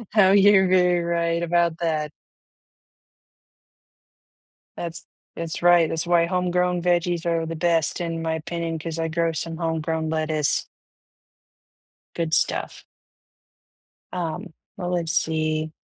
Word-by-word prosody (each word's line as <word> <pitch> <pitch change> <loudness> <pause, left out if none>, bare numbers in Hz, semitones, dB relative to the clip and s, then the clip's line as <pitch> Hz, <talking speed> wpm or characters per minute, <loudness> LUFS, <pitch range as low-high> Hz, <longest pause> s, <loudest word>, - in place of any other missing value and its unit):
Oh, 190 -2 +6
you're 195 -1 +5
very 180 -1 +3
right 170 0 -1
about 170 -1 +1
that. 155 -3 -1 2.7
That's 170 -1 -6 0.3
that's 165 -1 -5
right, 175 -2 +5
that's 160 +1 -2
why 170 -1 +3
homegrown 180 0 0
veggies 175 -1 0
are 165 -1 0
the 165 - -5
best 165 0 +1
in 165 -1 -3
my 160 0 -1
opinion, 165 +1 -4
'cause 165 +1 -5
I 165 - -1
grow 165 +1 0
some 165 +1 -5
homegrown 160 -1 -2
lettuce 155 -2 +1 1.5
Good 165 -2 -3
stuff. - - +1 1.3
Um, 175 +1 -4 0.2
well, 180 -2 -4
let's 165 -2 0
see 155 -1 0
170 Hz, 115 wpm, -23 LUFS, 160-175 Hz, 2.7 s, Oh